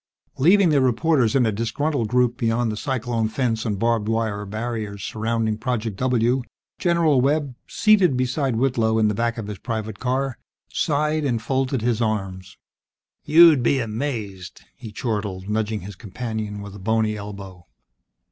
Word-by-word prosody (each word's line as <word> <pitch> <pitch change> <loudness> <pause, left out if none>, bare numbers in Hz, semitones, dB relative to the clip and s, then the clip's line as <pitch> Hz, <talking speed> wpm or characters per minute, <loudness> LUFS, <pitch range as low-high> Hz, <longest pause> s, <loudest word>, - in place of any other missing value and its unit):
Leaving 180 +6 +5
the 145 -3 +3
reporters 130 -1 +2
in 130 -3 +4
a 110 - +1
disgruntled 115 +4 -1
group 125 0 +2
beyond 115 -1 0
the - - -4
cyclone 120 -2 -1
fence 115 0 -1
and 105 -2 -1
barbed 115 0 +1
wire 110 -2 -1
barriers 110 -2 -4
surrounding 110 0 -1
Project 115 -4 -2
W, 125 +1 +1 0.4
General 170 -6 +3
Webb, 145 0 +1
seated 195 - +3
beside 130 0 0
Whitlow 115 -3 +1
in 110 -1 +3
the - - 0
back 115 +3 -1
of 110 - -4
his 105 -1 -7
private 110 -3 -4
car, 130 0 -1 0.3
sighed 150 +1 0
and 125 -5 0
folded 130 +1 -1
his 120 -1 0
arms. 95 -4 -3 0.7
"You'll 165 -1 +7
be 130 +3 +2
amazed!" 110 -6 -4
he 115 -3 -10
chortled, 105 -4 -3
nudging 110 0 -1
his 100 +2 -9
companion 105 0 -5
with 100 -1 -9
a - - -9
bony 110 +2 0
elbow. 100 -4 -9
115 Hz, 155 wpm, -23 LUFS, 105-130 Hz, 0.7 s, You'll